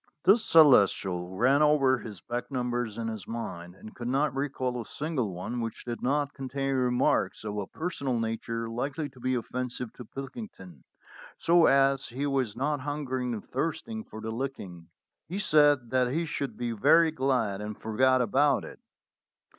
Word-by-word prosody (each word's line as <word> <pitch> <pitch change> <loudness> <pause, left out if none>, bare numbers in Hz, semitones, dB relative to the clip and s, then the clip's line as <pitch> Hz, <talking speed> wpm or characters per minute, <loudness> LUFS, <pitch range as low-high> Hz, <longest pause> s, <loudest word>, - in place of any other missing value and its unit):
The 195 - +7
Celestial 100 - +4
ran 135 +6 +4
over 140 -4 +4
his 105 -8 -9
back 120 +1 -4
numbers 120 -4 -2
in 115 -1 -3
his 110 -4 -6
mind, 90 -7 -6
and 110 +2 -12
could 120 - -6
not 135 +2 +1
recall 130 -3 -2
a - - -9
single 145 -9 -2
one 95 +7 -4
which 115 -1 -5
did 120 -1 -5
not 145 +2 0
con 135 -1 -7
tain 135 +1 -1
remarks 125 -3 +1
of 105 -1 -4
a 100 - -4
personal 140 -7 -3
nature 115 0 -3
likely 135 +6 -3
to 130 -1 -18
be 130 +1 0
offensive 125 0 -4
to 125 - -10
Pilkington, 130 - -9 0.5
so, 170 0 +4
as 135 0 +3
he 130 +4 -4
was 135 -6 0
not 145 +3 -1
hungering 130 -3 -3
and 105 - -9
thirst 155 - -2
ing 220 -1 -5
for 110 - -12
a 110 - -3
licking, 105 -9 -6 0.4
he 180 - -4
said 145 - +3
that 130 -1 +3
he 165 +4 0
should 140 -7 -4
be 120 -1 -2
very 160 +9 +4
glad 125 -8 0
and 105 0 -6
forgot 130 +4 +2
about 135 +5 +2
it. - - -11
130 Hz, 175 wpm, -28 LUFS, 115-140 Hz, 0.5 s, The